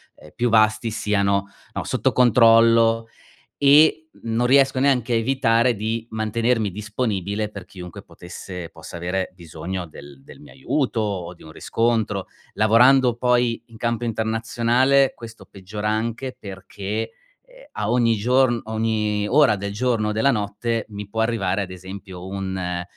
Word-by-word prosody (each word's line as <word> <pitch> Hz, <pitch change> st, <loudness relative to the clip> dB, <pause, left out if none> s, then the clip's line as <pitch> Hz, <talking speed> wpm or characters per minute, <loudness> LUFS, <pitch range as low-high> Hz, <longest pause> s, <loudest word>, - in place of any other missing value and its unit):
uhm, 75 Hz, -, -16 dB
più 120 Hz, 0 st, 0 dB
vasti, 110 Hz, +1 st, +3 dB
siano, 100 Hz, -2 st, 0 dB, 0.3 s
no, -, -, -3 dB
sotto -, -, 0 dB
controllo 115 Hz, -1 st, +5 dB, 0.6 s
e 155 Hz, +3 st, +5 dB
non 115 Hz, +2 st, 0 dB
riesco 135 Hz, 0 st, +4 dB
neanche 130 Hz, -4 st, +2 dB
a -, -, +3 dB
evitare 115 Hz, 0 st, +2 dB
di 110 Hz, +2 st, -3 dB
mantenermi 110 Hz, 0 st, 0 dB
disponibile 105 Hz, 0 st, -3 dB
per 100 Hz, -3 st, -10 dB
chiunque 90 Hz, -2 st, -10 dB
potesse 90 Hz, -1 st, -9 dB
possa 80 Hz, +1 st, -11 dB
avere 90 Hz, +2 st, -3 dB
bisogno 85 Hz, +1 st, -6 dB
del 70 Hz, -3 st, -14 dB
del -, -, -14 dB
mio 75 Hz, -, -15 dB
aiuto 135 Hz, -2 st, -1 dB
o 95 Hz, -5 st, -3 dB
di -, -, -19 dB
un 80 Hz, -, -12 dB
riscontro, 110 Hz, -3 st, -1 dB, 0.3 s
lavorando 120 Hz, +3 st, +4 dB
poi 120 Hz, -1 st, +1 dB
in 115 Hz, -1 st, -16 dB
campo 115 Hz, +1 st, -2 dB
internazionale, 115 Hz, +4 st, +1 dB
questo 115 Hz, 0 st, -11 dB
peggiora 105 Hz, +2 st, -5 dB
anche 115 Hz, +4 st, -3 dB
perché, 100 Hz, +2 st, -6 dB, 0.3 s
ehm, -, -, -18 dB
a -, -, -3 dB
ogni 120 Hz, -2 st, +2 dB
giorno 120 Hz, +2 st, +2 dB
ogni 110 Hz, -2 st, -1 dB
ora 135 Hz, -5 st, +4 dB
del 100 Hz, +1 st, -5 dB
giorno 115 Hz, -2 st, 0 dB
o -, -, -1 dB
della 110 Hz, +6 st, +2 dB
notte, 110 Hz, +1 st, -2 dB
mi 105 Hz, -1 st, -7 dB
può 110 Hz, +2 st, -4 dB
arrivare 105 Hz, -4 st, 0 dB
ad 95 Hz, -2 st, -4 dB
esempio 95 Hz, 0 st, -9 dB
un 95 Hz, -2 st, -4 dB
110 Hz, 145 wpm, -22 LUFS, 100-120 Hz, 0.6 s, controllo